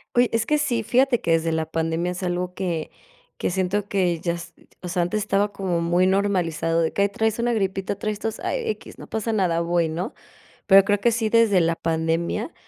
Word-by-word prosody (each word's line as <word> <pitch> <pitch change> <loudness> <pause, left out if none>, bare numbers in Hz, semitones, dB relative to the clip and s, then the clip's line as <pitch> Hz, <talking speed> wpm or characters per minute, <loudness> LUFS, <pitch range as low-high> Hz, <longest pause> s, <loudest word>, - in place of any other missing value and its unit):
Oye, 245 0 +4
es 225 0 +1
que 300 - +2
sí, 245 -6 0
fíjate 250 +2 +2
que 170 - -1
desde 165 0 +2
la 160 0 -2
pandemia 165 +2 -1
es 180 +1 -6
algo 180 0 -2
que 175 -4 -3 0.5
que - - -1
siento 190 +2 -1
que 180 -5 0
ya 170 +1 -1
es, 170 0 -8 0.3
o 180 - -4
sea, 175 0 0
antes 175 +5 0
estaba 205 0 +1
como 190 -4 -2
muy 175 +2 +2
normalizado, 180 -4 +1
de 160 - 0
que: 200 - +2
"Ay, 200 - +2
traes 220 +2 -1
una 240 0 +1
gripita, 195 -2 -1
traes 210 0 -3
tos, 225 0 -4
ay, 475 -2 -2
equis, 435 - -6
no - - -10
pasa 220 +1 -2
nada, 175 -5 +1
voy", 170 -1 +1
¿no?, 165 +4 -4 0.5
pero 195 -1 +7
creo 205 0 +1
que 235 - +3
sí, 225 -1 0
desde 220 -4 +4
la 165 0 +2
pandemia 165 - -1
190 Hz, 220 wpm, -23 LUFS, 170-215 Hz, 0.5 s, pero